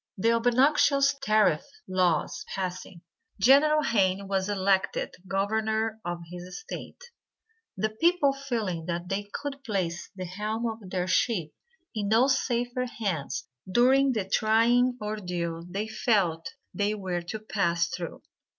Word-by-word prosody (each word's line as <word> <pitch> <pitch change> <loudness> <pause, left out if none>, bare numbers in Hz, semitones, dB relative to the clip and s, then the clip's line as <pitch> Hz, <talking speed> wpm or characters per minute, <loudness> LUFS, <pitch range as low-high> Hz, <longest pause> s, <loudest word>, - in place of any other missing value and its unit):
The 225 +4 +3
obnoxious 275 +4 +4
tariff 215 - +3 0.3
laws 185 - +1
passing, 185 -2 -5 0.4
General 295 +7 +5
Hayne 195 -5 +1
was 190 0 0
elected 195 -1 +1
Governor 220 +3 0
of 175 0 -4
his 180 +1 -8
State; 480 +1 -9 0.7
the 215 +3 0
people 325 +3 +3
feeling 225 -12 -3
that 175 +1 -3
they 205 +1 -3
could 280 -1 -5
place 185 -8 -2
the 185 -1 -5
helm 210 +6 -3
of 220 -4 -4
their 180 -1 -1
ship 185 -5 +1 0.4
in 210 -3 -2
no 225 +4 +5
safer 250 -2 0
hands 170 - -3 0.2
during 260 +5 +4
the 210 -5 -1
trying 235 +4 +3
ordeal 180 -5 -4
they 200 +4 -3
felt 195 -7 +1 0.2
they 205 +1 0
were 185 -4 -3
to 170 +6 -5
pass 175 -6 0
through. 170 0 -6
210 Hz, 130 wpm, -27 LUFS, 185-240 Hz, 0.7 s, General